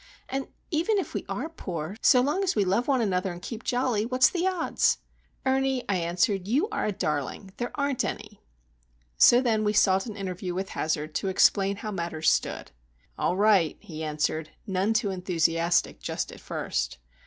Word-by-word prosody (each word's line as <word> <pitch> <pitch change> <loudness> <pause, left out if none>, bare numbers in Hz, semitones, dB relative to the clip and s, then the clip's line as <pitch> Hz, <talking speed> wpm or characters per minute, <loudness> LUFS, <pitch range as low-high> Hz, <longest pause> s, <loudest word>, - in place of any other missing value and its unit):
—And 270 +1 -3 0.2
even 340 +7 +1
if 385 - -3
we - - -3
are - - -3
poor, 180 - -5
so 250 - +6
long 295 +9 0
as 375 - 0
we 205 - +2
love 200 +7 +1
one 265 -3 +2
another 190 -3 0
and 175 - -8
keep 225 +5 -7
jolly, 245 -4 +1
what's 255 +2 +3
the 360 0 0
odds?" 370 -3 +1 0.5
"Ernie," 265 -1 +1
I 200 - +1
answered, 180 +3 0
"you 280 - +2
are 430 - -1
a - - +1
darling. 180 +2 -3
There 240 - -2
aren't 280 -3 0
any!" - - -6 0.8
So 240 +1 +7
then 225 -4 +1
we 210 0 +1
sought 195 -1 +3
an 215 - -6
interview 185 -2 -4
with 190 +1 -3
Hazard 155 0 -2
to 195 - -2
explain 195 +1 +3
how 215 +2 -5
matters 170 -4 0
stood. - - -2 0.4
"All 180 - 0
right," 200 -6 +4
he 160 -2 -8
answered, 155 +1 -1 0.2
none 195 +1 0
too 215 -3 +1
enthusiastic 170 -2 +1
just - - -3
at - - -11
first. - - -3
200 Hz, 180 wpm, -27 LUFS, 175-250 Hz, 0.8 s, So